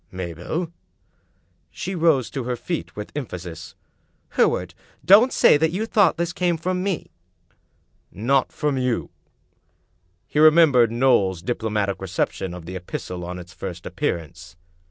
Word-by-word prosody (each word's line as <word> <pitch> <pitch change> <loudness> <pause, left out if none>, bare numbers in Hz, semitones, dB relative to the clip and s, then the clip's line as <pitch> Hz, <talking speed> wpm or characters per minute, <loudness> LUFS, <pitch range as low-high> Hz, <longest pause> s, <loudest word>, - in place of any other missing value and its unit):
"Mabel!" 90 - -4 1.0
She 190 -1 -5
rose 160 -8 +2
to 130 -3 -4
her 125 0 -1
feet 160 +8 -5
with 105 0 -7
emphasis. 90 - -7 0.3
" - - -43
Hereward, - - +2 0.3
don't 215 +8 +7
say - - +5
that 160 +2 +2
you 190 +7 -2
thought 205 -6 +3
this 170 0 -2
came 175 -1 0
from 180 +3 -2
me!" 190 -4 -3 1.0
"Not 130 +6 +1
from 145 -3 -1
you?" 125 -2 -1 1.1
He 150 - -2
remembered 155 -7 +6
Knowles's 115 -8 +2
diplo 115 +1 -2
matic 100 -2 -1
reception 95 0 -2
of 90 -2 -10
the 90 +2 -7
epistle 90 0 -6
on 90 +1 -5
its 90 0 -11
first 90 -2 -7
appearance. 85 0 -4
125 Hz, 140 wpm, -23 LUFS, -, 1.1 s, don't